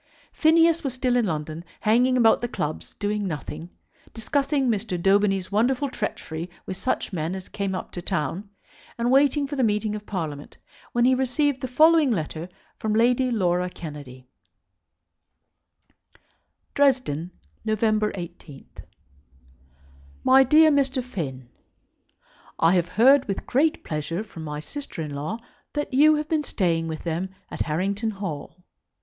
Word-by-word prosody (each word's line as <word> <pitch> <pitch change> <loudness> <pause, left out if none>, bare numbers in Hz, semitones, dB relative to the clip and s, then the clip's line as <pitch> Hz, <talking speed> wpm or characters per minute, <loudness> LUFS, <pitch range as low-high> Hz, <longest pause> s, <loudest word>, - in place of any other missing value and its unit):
Phineas 330 +1 +4
was 265 -3 -3
still 255 -1 +1
in 240 -3 +2
London, 155 0 -4 0.2
hanging 245 +4 +3
about 225 -2 +4
the 240 - -1
clubs, 155 -9 -5
doing 205 0 -2
nothing, 160 0 -6 0.5
discussing 275 +4 0
Mr. 210 -5 -1
Daubeny's 195 0 +2
wonderful 250 +7 +1
treachery 170 -7 -4 0.2
with 190 - -5
such 235 0 -2
men 165 +1 -2
as 190 -1 -7
came 200 -2 -3
up 185 - -6
to 175 - -6
town, 175 +3 -3 0.5
and 240 +1 0
waiting 280 +1 +4
for 285 +1 -5
the 265 - +1
meeting 210 -1 +1
of 210 0 -8
Parliament, 155 -7 -5 0.3
when 240 0 +2
he 260 - +5
received 265 +2 0
the 260 - -2
following 310 +3 +5
letter 165 -4 -3 0.3
from 215 -1 -1
Lady 245 +3 +3
Laura 180 -5 +1
Kennedy: 145 -7 -9 2.5
Dresden, 255 - +1 0.3
November 215 -1 +1
18,. 170 -6 -9 1.6
MY 265 +1 +7
DEAR 310 +4 +6
MR. 270 -2 +1
FINN, 140 - -6 1.1
I 165 +2 +4
have 175 -2 +2
heard 260 +8 +5
with 195 - -3
great 300 +5 +1
pleasure 165 +5 -3
from 175 -7 -10
my 150 -1 -5
sister 200 - -7
in 150 -2 -6
law 150 +10 -3 0.4
that 295 -2 -3
you 305 +4 +6
have 300 0 -2
been 315 -1 +1
staying 165 - 0
with 160 -1 -5
them 170 +3 -2 0.2
at - - -5
Harrington 195 +8 -1
Hall. 185 -3 -6
210 Hz, 145 wpm, -24 LUFS, 170-260 Hz, 2.5 s, MY